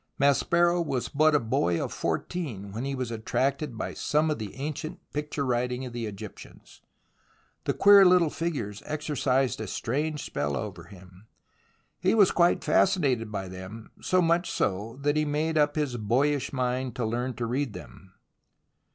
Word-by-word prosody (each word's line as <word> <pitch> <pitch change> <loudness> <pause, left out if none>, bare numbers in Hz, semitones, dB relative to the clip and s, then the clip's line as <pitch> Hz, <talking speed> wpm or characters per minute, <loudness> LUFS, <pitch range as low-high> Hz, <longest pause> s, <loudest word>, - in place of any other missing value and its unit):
Maspero 170 +5 +3
was 130 -6 -2
but 155 +1 +3
a - - +5
boy 90 -7 0
of - - -3
fourteen 115 - -3
when 115 +6 -4
he 140 0 -2
was 130 -3 -3
attracted 130 +3 -1
by - - -4
some 155 +1 +1
of 150 - -2
the 105 -3 -6
ancient 155 +5 -5
picture 150 -1 -2
writing 125 +1 -1
of 125 - -8
the 120 -2 -3
Egyptians. 100 -2 -11 0.8
The - - 0
queer 200 -1 +8
little 180 -4 +5
figures 125 -12 -3
exercised 135 -5 0
a 110 - -4
strange 150 +9 -2
spell 70 0 -2
over 90 -5 -6
him. 95 +2 -15 0.7
He 185 +4 +2
was 205 -4 +6
quite 175 0 +3
fascinated 130 - +2
by 95 -2 -4
them, 95 +5 -9
so 185 -1 +2
much 170 +2 +2
so, 105 +5 -2
that 145 +1 +2
he 155 - +3
made 150 +2 -1
up 150 -1 +3
his 145 -5 -1
boyish 130 +6 +1
mind 130 -1 -2
to 125 -3 -1
learn 120 +3 -2
to 120 - -3
read 125 0 -1
them. 95 +1 -12
130 Hz, 165 wpm, -27 LUFS, 110-155 Hz, 0.8 s, queer